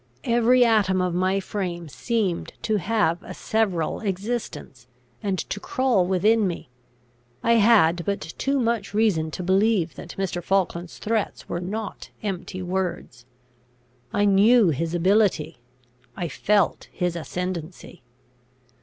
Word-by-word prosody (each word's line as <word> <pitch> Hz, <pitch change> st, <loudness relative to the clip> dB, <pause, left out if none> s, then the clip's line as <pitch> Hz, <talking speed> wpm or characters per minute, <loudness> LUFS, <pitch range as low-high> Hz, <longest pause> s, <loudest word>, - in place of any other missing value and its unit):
Every 240 Hz, +1 st, +4 dB
atom 205 Hz, -5 st, +3 dB
of 180 Hz, -1 st, 0 dB
my 185 Hz, +2 st, +1 dB
frame 180 Hz, -4 st, -4 dB
seemed 200 Hz, -, -2 dB
to 215 Hz, -1 st, +1 dB
have 195 Hz, -3 st, +1 dB
a -, -, -9 dB
several 195 Hz, -8 st, 0 dB
existence, 195 Hz, -, -4 dB, 0.3 s
and 195 Hz, -2 st, -1 dB
to 195 Hz, -, -4 dB
crawl 240 Hz, -6 st, +1 dB
within 205 Hz, +3 st, +3 dB
me. 170 Hz, -7 st, -6 dB, 0.7 s
I 230 Hz, -, +3 dB
had 200 Hz, -7 st, +4 dB
but 200 Hz, +1 st, -1 dB
too 270 Hz, -, -2 dB
much 230 Hz, -4 st, -1 dB
reason 195 Hz, -8 st, +2 dB
to 180 Hz, -, -5 dB
believe 190 Hz, -1 st, +2 dB
that -, -, -9 dB
Mr. 185 Hz, -2 st, -2 dB
Falkland's 175 Hz, -2 st, -1 dB
threats 220 Hz, -1 st, -2 dB
were 175 Hz, -, -3 dB
not 205 Hz, +4 st, -5 dB
empty 185 Hz, -2 st, -4 dB
words. 175 Hz, -10 st, -4 dB, 0.8 s
I 205 Hz, 0 st, +2 dB
knew 205 Hz, +1 st, +5 dB
his 165 Hz, +3 st, -1 dB
ability; 175 Hz, -, +2 dB, 0.6 s
I 175 Hz, -3 st, -2 dB
felt 205 Hz, +8 st, +1 dB
his 180 Hz, -2 st, -2 dB
ascendancy. 175 Hz, +1 st, -5 dB
190 Hz, 125 wpm, -24 LUFS, 175-215 Hz, 0.8 s, knew